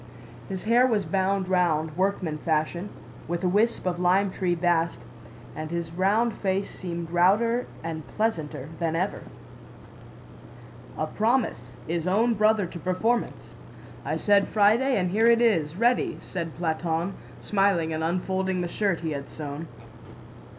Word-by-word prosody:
His 190 Hz, -1 st, -5 dB
hair 240 Hz, +3 st, +4 dB
was 215 Hz, -5 st, +1 dB
bound 190 Hz, 0 st, 0 dB
round, 160 Hz, -4 st, +1 dB
workman 185 Hz, -4 st, -1 dB
fashion, 160 Hz, +5 st, -1 dB, 0.4 s
with 175 Hz, +2 st, -3 dB
a -, -, +3 dB
wisp 210 Hz, +5 st, +1 dB
of 175 Hz, -1 st, -1 dB
lime 185 Hz, +2 st, +3 dB
tree 180 Hz, -2 st, 0 dB
bast, 165 Hz, -6 st, 0 dB, 0.5 s
and 155 Hz, 0 st, -5 dB
his 170 Hz, -1 st, -3 dB
round 205 Hz, +7 st, +2 dB
face 195 Hz, 0 st, -2 dB
seemed 170 Hz, -2 st, -5 dB
rounder 215 Hz, +8 st, +3 dB, 0.2 s
and 160 Hz, -2 st, -5 dB
pleasanter 160 Hz, -, -2 dB
than 165 Hz, -1 st, 0 dB
ever. 185 Hz, +4 st, -1 dB, 1.8 s
"A -, -, 0 dB
promise 220 Hz, -, 0 dB
is 170 Hz, +1 st, -2 dB
own 225 Hz, +6 st, +3 dB
brother 215 Hz, -1 st, +3 dB
to 170 Hz, 0 st, -8 dB
performance! 200 Hz, +8 st, -1 dB, 0.5 s
I -, -, -2 dB
said 200 Hz, -1 st, +3 dB
Friday 225 Hz, +5 st, +3 dB
and 180 Hz, -2 st, 0 dB
here 220 Hz, +4 st, +3 dB
it 235 Hz, 0 st, +6 dB
is, 170 Hz, -10 st, +2 dB
ready," 240 Hz, +5 st, +2 dB
said 170 Hz, -3 st, -5 dB
Platón, 165 Hz, +1 st, -1 dB, 0.3 s
smiling 195 Hz, -5 st, +1 dB
and 160 Hz, 0 st, -2 dB
unfolding 185 Hz, +2 st, -1 dB
the 175 Hz, -, -1 dB
shirt 190 Hz, -1 st, -1 dB
he 160 Hz, -1 st, -2 dB
had 140 Hz, -1 st, -5 dB
sewn. 150 Hz, +1 st, -6 dB
185 Hz, 145 wpm, -26 LUFS, 165-205 Hz, 1.8 s, it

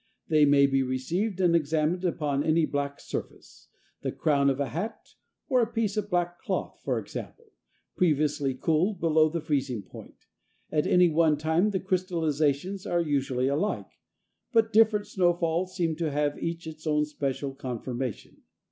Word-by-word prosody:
They 155 Hz, -2 st, +5 dB
may 140 Hz, -1 st, +5 dB
be 135 Hz, -1 st, +2 dB
received 165 Hz, -, -2 dB
and 175 Hz, -2 st, +4 dB
examined 160 Hz, +3 st, +1 dB
upon 145 Hz, -5 st, 0 dB
any 160 Hz, 0 st, +3 dB
black 140 Hz, -1 st, -3 dB
surface -, -, -8 dB, 0.3 s
the -, -, -2 dB
crown 140 Hz, -2 st, +2 dB
of 135 Hz, 0 st, -1 dB
a 140 Hz, -, -1 dB
hat, 200 Hz, +8 st, -5 dB, 0.4 s
or 255 Hz, -4 st, +3 dB
a 230 Hz, 0 st, -1 dB
piece 225 Hz, -3 st, -1 dB
of 210 Hz, -1 st, -2 dB
black 175 Hz, -1 st, -1 dB
cloth, -, -, -3 dB
for -, -, 0 dB
example 465 Hz, -2 st, -8 dB, 0.4 s
previously 150 Hz, -5 st, +1 dB
cooled 170 Hz, +8 st, +1 dB
below 155 Hz, -1 st, +3 dB
the 165 Hz, +1 st, -3 dB
freezing 135 Hz, -, -1 dB
point. -, -, -14 dB, 0.5 s
At 150 Hz, -1 st, +1 dB
any 180 Hz, 0 st, +5 dB
one 155 Hz, -1 st, +3 dB
time 160 Hz, +6 st, +2 dB
the 195 Hz, -2 st, -1 dB
crystallizations 175 Hz, -1 st, -1 dB
are 175 Hz, -, +1 dB
usually 135 Hz, -5 st, 0 dB
alike, 155 Hz, +10 st, -1 dB, 0.6 s
but 225 Hz, -2 st, +2 dB
different 215 Hz, -1 st, +4 dB
snow 185 Hz, -4 st, +2 dB
falls 170 Hz, +2 st, -1 dB
seem 165 Hz, -4 st, 0 dB
to 165 Hz, -2 st, -1 dB
have 145 Hz, 0 st, -1 dB
each 165 Hz, 0 st, -3 dB
its 160 Hz, 0 st, -8 dB
own 150 Hz, 0 st, +2 dB
special 140 Hz, -2 st, -3 dB
conformation. 125 Hz, -2 st, -5 dB
160 Hz, 160 wpm, -27 LUFS, 145-180 Hz, 0.6 s, They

